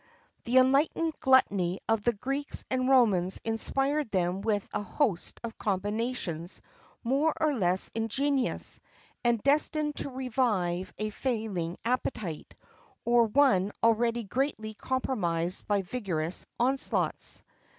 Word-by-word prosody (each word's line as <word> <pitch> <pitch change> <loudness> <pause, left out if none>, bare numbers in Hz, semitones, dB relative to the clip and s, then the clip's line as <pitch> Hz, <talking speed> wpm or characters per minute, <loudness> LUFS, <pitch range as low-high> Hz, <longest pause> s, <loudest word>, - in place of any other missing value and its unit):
[XXIV 475 +1 -33
3] 240 - -3
The - - +6
enlightened 295 +5 +2
gluttony 200 -9 +3
of 225 -1 +2
the 240 +3 +2
Greeks 275 +6 -2
and 255 0 +1
Romans 200 -9 +4
inspired 270 +5 +1
them 185 -1 0
with 205 -1 0
a 205 - -1
host 205 - -1
of 230 -1 -7
combinations 205 -4 -2 0.4
more 275 +6 +1
or 310 -2 +2
less 185 -6 +1
ingenious, 260 +4 0 0.4
and 235 -3 +2
destined 295 +1 +1
to - - -3
revive 225 -9 -1
a 215 0 -2
failing 215 -9 -2
appetite, 225 - -3 0.5
or 235 0 +5
one 210 -6 +3
already 230 +1 +2
greatly 220 -1 -2
compromised 185 -9 -2
by 205 -2 +1
vigorous 180 -6 -3
onslaughts. 265 +3 0
230 Hz, 120 wpm, -29 LUFS, 195-265 Hz, 0.5 s, The